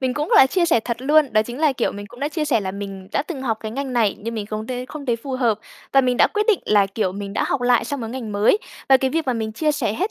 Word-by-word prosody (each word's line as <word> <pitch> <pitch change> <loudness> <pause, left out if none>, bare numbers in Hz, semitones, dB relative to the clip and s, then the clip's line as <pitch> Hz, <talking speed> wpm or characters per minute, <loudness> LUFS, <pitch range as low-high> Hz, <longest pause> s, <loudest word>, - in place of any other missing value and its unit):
mình 260 -1 -1
cũng 300 +1 -2
là 265 - +8
chia 350 +6 +1
sẻ 320 -9 +3
thật 235 +1 -3
luôn, 295 -1 +3
đó 215 0 +4
chính 240 +3 -8
là, 310 -3 +4
kiểu, 245 - -1
mình 205 0 -8
cũng 245 - -14
đã 290 - 0
chia 310 0 -2
sẻ 275 -7 +2
là 190 -2 -3
mình 195 -1 -7
đã - - +1
từng 300 -4 -6
học 230 -4 0
cái 220 - -5
ngành 270 +1 -4
này 225 -5 +2
nhưng 230 +2 -5
mình 210 -2 -4
không 215 +1 -5
t - - -7 0.2
không 295 -2 -8
thấy 240 -2 +1
phù 265 +4 -7
hợp 240 -5 +1 0.3
và 275 - +6
mình 250 -1 +1
đã - - +6
quyết 420 0 -1
định 430 - +4
là, 205 -2 +4
kiểu, 195 -1 -2
mình 200 0 -6
đã - - 0
học 275 - 0
lại 245 -1 +3
sang 280 +3 -4
mớ 225 - -4
ngành 230 -3 -6
mới. 205 - +3 0.3
Và 270 - +8
cái 265 0 -1
việc 320 +1 -1
mà 255 - +1
mình 220 -2 -3
chia 300 +7 0
sẻ 255 -8 -1
hết 385 - -2
245 Hz, 325 wpm, -21 LUFS, 215-280 Hz, 0.3 s, là